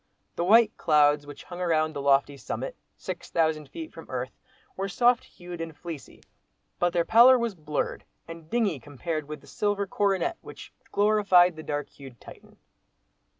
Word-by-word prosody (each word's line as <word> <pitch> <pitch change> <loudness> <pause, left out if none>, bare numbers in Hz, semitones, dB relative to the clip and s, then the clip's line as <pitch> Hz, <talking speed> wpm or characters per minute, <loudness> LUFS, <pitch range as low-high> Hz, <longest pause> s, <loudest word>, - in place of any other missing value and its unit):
The 170 - -1
white 220 +4 +5
clouds 145 -1 +3
which 145 - -10
hung 175 0 -9
round 155 -3 +1
the 140 - -4
lofty 140 0 +2
summit—six - - -7
thousand 155 -3 0
feet 325 -1 -8
from - - -12
earth, - - -4 0.4
were 195 +1 -3
soft 245 +3 +3
hued 175 -1 -10
and 165 -2 -7
fleecy; 165 -5 -9 0.6
but 175 0 +2
their 170 -1 +1
pallor 245 +3 +7
was 235 -3 -2
blurred 150 -4 -3 0.2
and 165 -1 -11
dingy 215 - 0
compared 145 +4 -5
with 150 -1 -7
the - - -18
silver 205 -1 -1
coronet 200 - 0
which - - -12 0.2
glorified 200 -4 +4
the 155 - -8
dark 145 -2 -3
hued 135 -4 -14
Titan. - - -15
170 Hz, 160 wpm, -27 LUFS, 150-205 Hz, 0.6 s, pallor